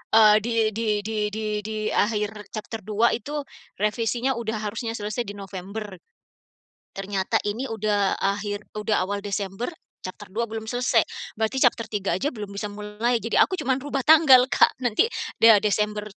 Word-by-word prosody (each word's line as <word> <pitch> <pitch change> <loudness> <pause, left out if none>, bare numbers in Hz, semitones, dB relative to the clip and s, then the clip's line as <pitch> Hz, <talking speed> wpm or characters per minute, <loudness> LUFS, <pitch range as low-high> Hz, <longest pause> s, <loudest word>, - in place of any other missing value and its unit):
eee 215 -1 +8
di 230 +3 -4 0.2
di 225 +1 -3 0.2
di 220 +1 -4 0.2
di 215 -1 -2
di 215 +1 -5 0.2
akhir 210 -1 -1
chapter 220 +1 -5
2 215 +3 +1
itu 290 +4 -3 0.3
revisinya 230 +4 0
udah 225 -1 -3
harusnya 225 +2 -4
selesai 210 +2 -3
di 205 - -6
November. 195 0 -7 1.0
Ternyata 195 -1 -1
ini 220 +6 -3
udah 210 -4 0
akhir 205 +1 -2
udah 210 -2 +1
awal 200 +2 -2
Desember, 200 +2 -3 0.4
chapter 195 +3 -8
2 230 +4 -1
belum 220 0 -6
selesai, 245 -1 +2 0.3
berarti 220 +5 -1
chapter 230 -2 +2
3 200 -4 -1
aja 190 +11 -1
belum 210 -4 -7
bisa 205 +1 -3
mulai. 210 +4 -1
Jadi 230 +1 -4
aku 375 - +3
cuma 260 - 0
rubah 275 0 -3
tanggal, 295 -5 +8
Kak, - - +4
nanti 245 - +3 0.3
ya 225 -2 +9
Desember 210 +1 0
215 Hz, 160 wpm, -24 LUFS, 205-230 Hz, 1.0 s, ya